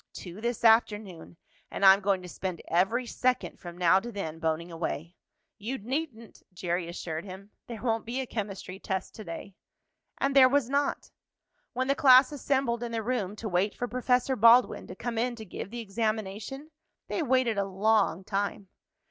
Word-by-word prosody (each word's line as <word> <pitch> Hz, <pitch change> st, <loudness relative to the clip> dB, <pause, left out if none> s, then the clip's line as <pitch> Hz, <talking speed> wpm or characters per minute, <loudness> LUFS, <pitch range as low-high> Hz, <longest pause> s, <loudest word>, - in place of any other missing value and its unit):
"Two 180 Hz, +3 st, -9 dB
this 235 Hz, 0 st, -2 dB
afternoon, 210 Hz, -7 st, +2 dB, 0.3 s
and 195 Hz, -, -1 dB
I'm 190 Hz, +1 st, +8 dB
going 195 Hz, -2 st, 0 dB
to -, -, -8 dB
spend 180 Hz, 0 st, -5 dB
every 195 Hz, +9 st, +1 dB
second 250 Hz, +1 st, -1 dB
from 175 Hz, -1 st, -9 dB
now 180 Hz, +1 st, +5 dB
to 240 Hz, +4 st, -7 dB
then 165 Hz, -7 st, -5 dB
boning 165 Hz, +1 st, -2 dB
away." 165 Hz, 0 st, -4 dB, 0.4 s
"You 235 Hz, +6 st, -3 dB
needn't," 245 Hz, -1 st, -5 dB
Jerry 175 Hz, -1 st, -2 dB
assured 165 Hz, -2 st, -5 dB
him. 195 Hz, +1 st, -10 dB, 0.2 s
"There 235 Hz, -2 st, -8 dB
won't 225 Hz, -2 st, 0 dB
be 245 Hz, +3 st, -2 dB
a 265 Hz, -, -2 dB
chemistry 195 Hz, -4 st, -5 dB
test 190 Hz, -2 st, -4 dB
to 215 Hz, -, -9 dB
day." 185 Hz, +2 st, -8 dB, 0.6 s
And 275 Hz, 0 st, 0 dB
there 260 Hz, -2 st, +8 dB
was 270 Hz, -2 st, +1 dB
not. 285 Hz, 0 st, -1 dB, 0.6 s
When 260 Hz, +1 st, -1 dB
the 275 Hz, -, +3 dB
class 270 Hz, -3 st, +6 dB
assembled 265 Hz, -4 st, 0 dB
in 240 Hz, -1 st, -4 dB
the 225 Hz, -1 st, -2 dB
room 210 Hz, -5 st, -2 dB
to 220 Hz, +1 st, -6 dB
wait 195 Hz, +2 st, 0 dB
for 245 Hz, -, -3 dB
Professor 250 Hz, +1 st, +1 dB
Baldwin 235 Hz, +2 st, +5 dB
to 180 Hz, -, -8 dB
come 230 Hz, +3 st, -3 dB
in 245 Hz, +1 st, 0 dB
to 220 Hz, -2 st, -9 dB
give 190 Hz, -, -7 dB
the 235 Hz, +2 st, -6 dB
examination, 220 Hz, +6 st, -3 dB, 0.4 s
they -, -, -2 dB
waited 255 Hz, -6 st, +2 dB
a 200 Hz, -, +1 dB
long 195 Hz, -2 st, +1 dB
time. 200 Hz, 0 st, -3 dB
215 Hz, 180 wpm, -28 LUFS, 190-245 Hz, 0.6 s, I'm